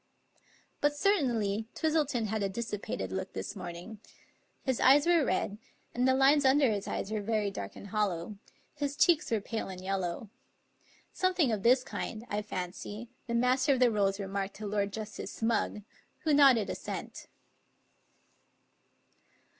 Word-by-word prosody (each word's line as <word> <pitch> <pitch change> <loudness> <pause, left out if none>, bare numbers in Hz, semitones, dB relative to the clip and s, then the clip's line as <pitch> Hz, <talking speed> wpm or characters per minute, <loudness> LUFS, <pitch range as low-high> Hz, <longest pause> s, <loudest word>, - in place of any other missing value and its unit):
But 290 0 +2
certainly 235 - +1
Twistleton 300 -7 +1
had 215 0 -2
a 200 - 0
dissipated 200 - -4
look 95 - -4
this 95 - -5
morning. 175 +5 -8 0.6
His 260 -3 0
eyes 280 +3 +6
were 340 -3 +4
red, 205 -1 -1 0.3
and 250 +2 +1
the 260 - +4
lines 280 +2 +5
under 270 -2 +4
his 200 -2 -3
eyes 195 - -3
were 215 -1 -1
very 210 -1 0
dark 100 - -6
and 200 - -10
hollow; 200 -2 -1 0.4
his 285 -1 -3
cheeks 335 -4 +4
were 225 - +1
pale 220 0 -4
and 185 -1 -7
yel 195 +1 -1
low. 180 +3 -4 0.8
Something 365 -8 +2
of 215 -3 -1
this 250 +4 +4
kind, 225 -2 -5
I 205 +1 -1
fancy, 205 +3 -6 0.2
the 235 - -1
Master 255 +3 +3
of - - -3
the 250 -2 +5
Rolls 200 -2 +1
remarked 195 0 -3
to 215 - -7
Lord 205 -1 -1
Justice 215 0 -6
Smugg, 225 -2 0 0.4
who 310 - +1
nodded 270 -7 +5
assent. - - -6
220 Hz, 155 wpm, -30 LUFS, 200-265 Hz, 0.8 s, eyes